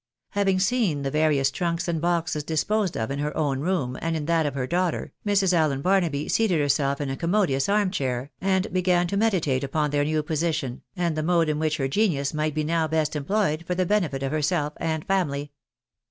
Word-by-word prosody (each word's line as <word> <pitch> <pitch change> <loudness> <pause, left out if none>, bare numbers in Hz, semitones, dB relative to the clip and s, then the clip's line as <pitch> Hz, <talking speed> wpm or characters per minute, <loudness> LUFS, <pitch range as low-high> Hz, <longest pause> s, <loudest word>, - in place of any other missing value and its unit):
Having 195 -2 +1
seen 195 - +1
the 135 - -2
various 150 -3 +2
trunks 170 +4 -2
and 165 -2 -1
boxes 165 -3 0
disposed 185 +5 0
of 110 +3 -2
in 140 - -3
her 150 +1 -2
own 140 -4 0
room, 145 -6 -1
and 165 0 -1
in 150 - -4
that 165 -1 +2
of 140 - -4
her 130 -2 -1
daughter, 175 +4 -1
Mrs. 195 -2 +3
Allen 150 -5 +1
Barnaby 175 -7 +1
seated 210 -8 +2
herself 140 -1 +1
in 140 -2 -2
a - - -2
commodious 170 -3 +1
arm 205 -2 +2
chair, 130 -5 -2
and 190 0 0
began 180 -1 +2
to 180 - -3
meditate 180 -11 +1
upon 150 +2 -1
their 145 0 +2
new 155 +1 0
position, 155 -4 -2
and 170 -3 0
the 155 - -1
mode 165 0 +2
in 150 0 -1
which 155 0 0
her 135 -3 0
genius 140 -4 +1
might 155 0 -1
be 155 - 0
now 160 +1 +1
best 155 -1 0
employed 155 +1 0
for 180 - -1
the 185 0 +1
benefit 170 -9 0
of 135 - -1
herself 150 0 0
and 160 -1 -2
family. 145 -7 -1
155 Hz, 210 wpm, -25 LUFS, 145-180 Hz, -, Mrs